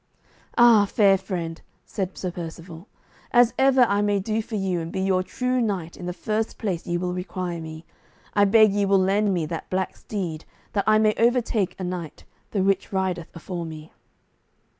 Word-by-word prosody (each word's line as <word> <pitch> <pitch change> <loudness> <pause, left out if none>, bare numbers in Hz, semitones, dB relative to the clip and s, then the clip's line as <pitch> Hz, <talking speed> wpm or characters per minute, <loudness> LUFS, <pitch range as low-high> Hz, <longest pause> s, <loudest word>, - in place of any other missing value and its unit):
"Ah, 235 -4 +7
fair 195 -1 +4
friend," 175 -4 -4 0.2
said 190 -2 -4
Sir 185 - -3
Percivale, 170 +1 -8 0.4
"as 240 -1 +5
ever 265 -1 +5
I 205 -3 +2
may 205 -1 +1
do 215 +3 -1
for 220 0 -7
you 190 -3 -1
and 165 0 -5
be 190 - -3
your 190 -1 +2
true 250 +6 -1
knight 190 -7 -2
in 175 - -7
the - - -1
first 215 +4 -2
place 190 -7 -3
ye 175 - 0
will 180 0 -2
require 180 -1 -4
me, 160 0 -9 0.5
I 205 -1 +4
beg 215 0 +5
ye 205 0 +1
will 195 0 +4
lend 195 +2 +2
me 175 -4 0
that 165 +1 -6
black 185 0 -2
steed, 175 -7 -5 0.3
that 200 - 0
I 215 0 +6
may 215 0 +3
overtake 230 -4 +1
a - - -4
knight, 180 -3 -5 0.3
the 195 -3 0
which 195 0 +1
rideth 185 -3 -2
afore 170 +1 -5
me." 155 -1 -9
190 Hz, 185 wpm, -24 LUFS, 175-215 Hz, 0.5 s, Ah